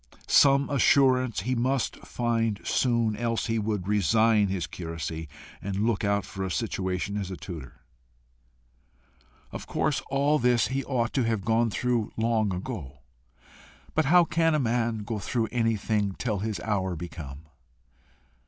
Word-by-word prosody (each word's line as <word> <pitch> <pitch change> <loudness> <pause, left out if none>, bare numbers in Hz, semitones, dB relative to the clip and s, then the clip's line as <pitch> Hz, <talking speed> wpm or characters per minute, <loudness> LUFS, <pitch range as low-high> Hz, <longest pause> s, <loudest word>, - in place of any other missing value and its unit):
Some 140 0 +5
assurance 130 -4 +3
he 125 +6 -1
must 130 +2 0
find 115 -3 -1
soon, 115 -4 +1
else 115 +1 -1
he 115 -1 0
would 105 -3 -2
resign 105 +2 +3
his 95 -4 -2
curacy, 80 0 -6 0.3
and 100 +2 -2
look 115 -3 0
out 100 0 +1
for 95 - -6
a 95 - -2
situation 95 -2 -2
as 95 -2 -4
tutor. 80 -8 -9 1.7
Of - - -7
course 145 -2 0
all 140 +2 +2
this 125 -1 +3
he 135 +1 -1
ought 120 -4 -1
to 130 - +1
have 110 -4 -1
gone 115 +1 +2
through 120 0 -1
long 110 -2 +1
ago! 90 - -6 0.9
But 155 - +2
how 175 +5 +6
can 165 -1 +2
a - - +2
man 115 -3 0
go 105 +1 -3
through 110 +3 -1
anything 110 -4 0
till 110 -5 -1
his 110 +1 -3
hour 95 -4 -1
be 85 +2 -5
come? 70 -4 -9
110 Hz, 145 wpm, -27 LUFS, 100-125 Hz, 1.7 s, how